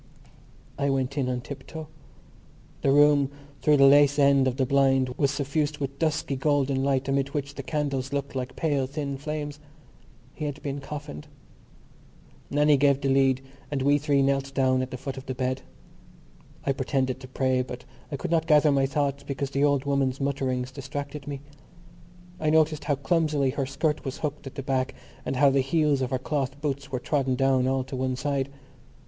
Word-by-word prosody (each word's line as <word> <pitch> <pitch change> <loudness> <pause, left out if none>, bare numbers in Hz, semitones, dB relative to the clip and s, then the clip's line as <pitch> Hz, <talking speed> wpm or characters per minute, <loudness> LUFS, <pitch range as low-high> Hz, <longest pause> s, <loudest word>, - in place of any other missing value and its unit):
I 140 - +1
went 135 0 0
in 135 -3 0
on 125 -1 -2
tiptoe. 145 +4 -8 0.9
The - - +2
room 145 -1 +5 0.3
through 150 -1 +4
the 135 - +7
lace 145 +1 +6
end 140 -2 +5
of 130 0 -1
the 135 - +2
blind 135 -1 +3
was 135 +2 0
suffused 145 +2 -1
with 140 -1 -5
dusky 155 -3 0
golden 135 -1 +1
light 135 -1 +1
amid 140 +1 0
which 140 -1 -2
the 140 - -6
candles 140 -2 -2
looked 140 -1 -3
like 130 0 -4
pale 145 -5 0
thin 140 0 -4
flames. 145 +1 -5 0.7
He 155 - -5
had 145 0 -4
been 140 0 -3
coffined. 150 +1 -7 1.2
Nannie 150 0 +4
gave 140 0 +3
the 140 -1 -1
lead 135 -1 +3 0.3
and 140 -3 -1
we 145 +1 +4
three 140 -1 +2
knelt 135 0 0
down 130 -1 +3
at 130 - -3
the 130 - -6
foot 135 +1 -6
of 130 - -9
the 130 - -3
bed. 130 +1 -1 1.0
I 140 - +2
pretended 130 -1 -1
to 130 - -10
pray 130 0 +1
but 125 0 -7 0.3
I - - -1
could 175 +4 -4
not 165 -1 +2
gather 150 -1 +5
my 135 -1 +2
thoughts 140 0 -1
because 140 0 -4
the 140 +1 +1
old 140 -2 +2
woman's 140 -2 0
mutterings 130 -2 -1
distracted 140 +2 -6
me. 140 -2 -5 1.0
I 155 - +1
noticed 155 -1 +2
how 145 - +2
clumsily 150 -2 +1
her 135 -1 -2
skirt 150 +3 -1
was 135 -2 -4
hooked 150 -2 -4
at 135 - -9
the 135 - -5
back 130 0 -1 0.3
and - - -1
how 140 +1 +5
the 135 0 +3
heels 145 0 +2
of 130 - -1
her 130 - 0
cloth 135 0 -2
boots 140 -1 -3
were 130 - -1
trodden 135 0 0
down 130 -1 +2
all 130 0 +1
to 130 +1 -7
one 130 0 -1
side. 135 +1 -1
140 Hz, 190 wpm, -26 LUFS, 130-145 Hz, 1.2 s, the